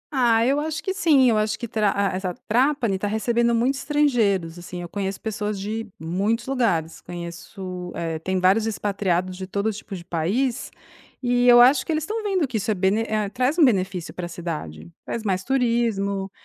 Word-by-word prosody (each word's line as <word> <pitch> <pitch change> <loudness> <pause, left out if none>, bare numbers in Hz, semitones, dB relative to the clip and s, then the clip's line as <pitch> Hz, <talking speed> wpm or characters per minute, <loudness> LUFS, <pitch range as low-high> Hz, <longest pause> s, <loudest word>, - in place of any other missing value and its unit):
Ah, 230 -3 +4
eu 275 +3 +2
acho 310 0 -3
que 380 - -1
sim, 310 -9 +4
eu 215 - +2
acho 215 0 0
que 235 - -5
Tra 215 -2 +1 0.2
ah - - -2
,essa 185 -1 -3
Trapani 240 -4 +2
tá 205 - -1
recebendo 235 +2 +1
muitos 260 +4 +1
estrangeiros, 220 - +1
assim, 180 +1 -8
eu 175 - -6
conheço 195 +1 -4
pessoas 210 -2 -3
de 220 +3 -4
muitos 195 +8 -1
lugares. 205 -12 0
Conheço, 180 +1 -7
eh, 165 -1 -3
tem 185 +3 -1
vários 195 +5 +3
expatriados 190 -4 -1
de 185 0 -7
todo 205 +2 -1
tipo 205 -1 -8
de 170 -2 -9
país 210 - -1 0.5
e 245 0 +2
eu 240 0 +8
acho 255 +4 +6
que - - -4
eles 310 -1 0
estão 435 +6 -3
vendo 380 -8 0
que 245 - -2
isso 210 +1 -3
é 215 - +2
bene 190 +4 +2
eh, 215 -1 0
traz 255 - 0
um 325 - +7
benefício 185 -7 0
pra 180 -1 -5
cidade. 155 - -6 0.2
Traz 230 - -4
mais 190 -2 -1
turismo, 230 -7 0
215 Hz, 195 wpm, -23 LUFS, 185-245 Hz, 0.5 s, eu